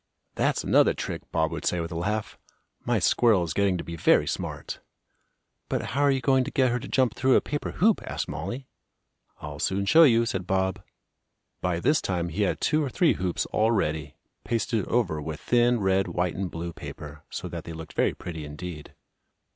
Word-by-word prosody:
"That's - - 0
another - - +4
trick," - - -4
Bob 80 -1 +1
would - - -5
say 90 - 0
with 85 +1 -4
a - - -5
laugh. 105 +5 -2 0.4
"My - - +1
squirrel 110 -7 +3
is 80 -3 -3
getting 100 0 +2
to - - -5
be 85 - -6
very 85 - +4
smart!" - - -4 0.9
"But - - -1
how 140 - +1
are 145 - +5
you 135 -1 +1
going 130 0 +3
to - - -4
get 130 -2 +2
her 125 - 0
to 130 - -8
jump 130 -3 +2
through 130 0 +3
a - - +7
paper 145 0 -4
hoop?" 215 +4 +3
asked - - -3
Mollie. 100 - -5 0.7
"I'll 75 -1 -7
soon 100 +5 0
show 160 +11 +6
you," 115 -7 +6
said 95 -5 -3
Bob. 95 +1 0 0.8
By 90 -2 0
this 145 - +2
time 85 -2 -1
he 90 +6 -3
had 100 - +1
two 155 0 +2
or 140 - -2
three 170 +5 +3
hoops 90 -2 -2
all 110 +1 +2
ready, 75 -8 -1 0.3
pasted 115 -3 -1
over 90 -11 0
with 75 0 -5
thin 120 0 +3
red, 95 0 +2
white 90 0 -1
and 95 0 -3
blue 85 +1 -5
paper, 75 -1 -9
so - - -5
that - - -6
they 85 - -7
looked 80 -1 -9
very - - +1
pretty 85 -3 -7
indeed. 75 +1 -8
95 Hz, 200 wpm, -26 LUFS, 85-120 Hz, 0.9 s, a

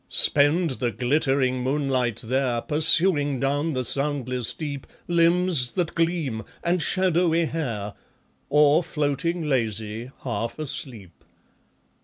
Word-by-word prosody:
Spend 150 +3 +3
the 120 - +1
glittering 130 +2 0
moonlight 130 -3 -1
there 125 0 -1
Pursuing 150 -2 +3
down 145 +4 -1
the 130 -1 -2
soundless 130 -4 +1
deep 145 -3 -6 0.2
Limbs 170 -6 +2
that 175 -3 -2
gleam 165 -9 -1 0.2
and 175 0 0
shadowy 170 -1 +1
hair, 115 -11 -4 0.6
Or 150 +2 +4
floating 155 +2 -2
lazy, 110 -3 -2
half 115 -2 -4
asleep. 125 - -5
145 Hz, 105 wpm, -24 LUFS, 125-165 Hz, 0.6 s, Or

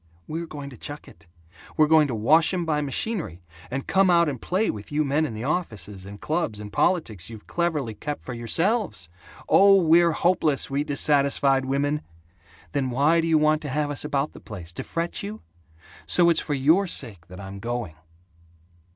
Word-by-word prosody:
We're 165 +2 -4
going 145 -3 -8
to 125 - -12
chuck 145 +5 -6
it. 105 - -17 0.5
We're 155 - +6
going 155 -1 +5
to 125 - -3
wash 155 +10 +4
'em 175 -2 -2
by 150 -2 0
machinery, 145 - -3 0.3
and 135 +2 -4
come 190 0 +3
out 170 -1 +4
and 135 -5 -4
play 195 +5 0
with 105 +4 -10
you 150 +1 +1
men 150 +3 +1
in 110 - -7
the 110 - -5
offices 105 - -3
and 100 +1 -10
clubs 155 -10 -2
and 105 0 -9
politics 115 - 0
you've 110 -2 -11
cleverly 155 -9 -1
kept 145 +8 -6
for 130 - -6
yourselves! 165 - 0 0.4
Oh, 195 0 +6
we're 170 0 +4
hopeless, 155 -6 +1
we 140 +1 0
dissatisfied 140 -2 +2
women! 145 +3 0 0.7
Then 135 -2 -1
why 145 +7 +3
do 165 - -2
you 160 -1 +4
want 155 0 +2
to 145 - -5
have 145 +2 -1
us 145 - -2
about 145 0 -1
the - - -11
place, 90 -5 -9
to - - -5
fret 170 +1 -3
you? 105 -2 -7 0.6
So 170 -1 +5
it's 165 - +2
for 145 - -2
your 160 +9 +3
sake 105 - -4
that 90 +1 -11
I'm 100 0 -8
going!" 120 -6 -4
145 Hz, 190 wpm, -24 LUFS, 115-165 Hz, 0.7 s, We're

